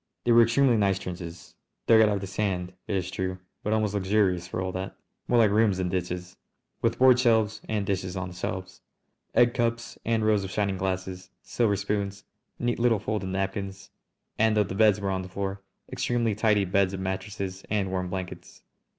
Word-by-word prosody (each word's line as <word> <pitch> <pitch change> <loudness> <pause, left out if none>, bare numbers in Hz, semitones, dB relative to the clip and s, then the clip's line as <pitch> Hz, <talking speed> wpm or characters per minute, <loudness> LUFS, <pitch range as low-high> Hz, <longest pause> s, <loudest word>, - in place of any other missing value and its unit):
They 120 - +2
were 120 0 +8
extremely 120 +1 +4
nice 100 -2 +2
trenches, 90 -3 -8 0.3
dug 110 -1 +6
out 110 - +5
of 100 -2 -1
the - - -4
sand, 95 -2 -2
it 100 - -1
is 90 -1 -2
true, 95 -1 -3 0.2
but 105 - -2
almost 110 -2 +1
luxurious 95 -3 +1
for 90 - -4
all 95 0 -2
that, 95 +1 -5 0.3
more 120 - +3
like 110 -3 +5
rooms 105 -2 +3
than 90 -1 -1
ditches, 90 0 -4 0.4
with - - +1
board 130 -1 +6
shelves 110 -4 +2
and 105 -2 0
dishes 95 -1 -2
on 90 0 -3
the - - -10
shelves, 95 +1 -5 0.5
egg 120 0 +5
cups 115 -1 -2
and 115 -1 +1
rows 105 -2 +3
of 95 - -5
shining 100 0 -1
glasses, 95 0 -3
silver 110 -4 +1
spoons, 100 0 -2 0.3
neat 120 -1 -1
little 115 -2 +3
folded 105 -1 -3
napkins, 95 0 -4 0.5
and, 110 0 +3
though 105 - +5
the 95 - -6
beds 105 0 +4
were 100 -1 -1
on 95 -1 -1
the 95 - -8
floor, 95 +1 -4 0.3
extremely 120 -2 0
tidy 105 -1 +2
beds 95 +1 +1
of - - -6
mattresses 95 0 -4
and 100 -2 0
warm 90 -1 -2
blankets. 90 -1 -7
100 Hz, 195 wpm, -27 LUFS, 95-110 Hz, 0.5 s, were